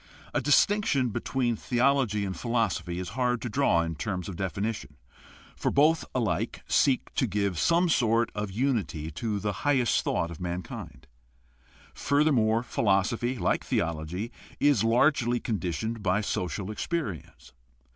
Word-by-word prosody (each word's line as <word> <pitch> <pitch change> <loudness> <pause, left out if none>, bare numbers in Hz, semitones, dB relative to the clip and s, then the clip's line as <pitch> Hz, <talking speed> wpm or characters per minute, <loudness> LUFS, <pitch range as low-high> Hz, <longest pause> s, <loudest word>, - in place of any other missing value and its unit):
— - - -22
A - - +1
dis 145 - +5
tinction 170 - 0
between 120 -1 -1
theology 125 -3 +1
and 95 -1 -4
philosophy 95 -5 -1
is 90 -1 -4
hard 125 +1 0
to 120 - -3
draw 105 -9 +2
in 80 0 -3
terms 90 +4 -4
of 95 - -6
definition, 95 - -3 0.6
for - - -1
both 155 +3 +3
alike 120 -4 -1
seek 135 -2 +2
to 130 - +1
give 100 -4 -1
some 170 +1 +3
sort 115 -6 +2
of 105 -1 -3
unity 100 - -1
to 105 +5 -3
the 105 +1 -2
highest 135 -5 +2
thought 85 - -1
of 85 - -9
mankind. 90 -1 -6 0.9
Furthermore, 125 -6 +2
philosophy, 115 +3 0
like - - 0
theology, 85 +7 -2 0.3
is 145 -7 +3
largely 120 +1 +3
conditioned 110 +2 -3
by 95 0 +1
social 100 0 -3
experience. 110 - -5
110 Hz, 140 wpm, -28 LUFS, 95-130 Hz, 0.9 s, dis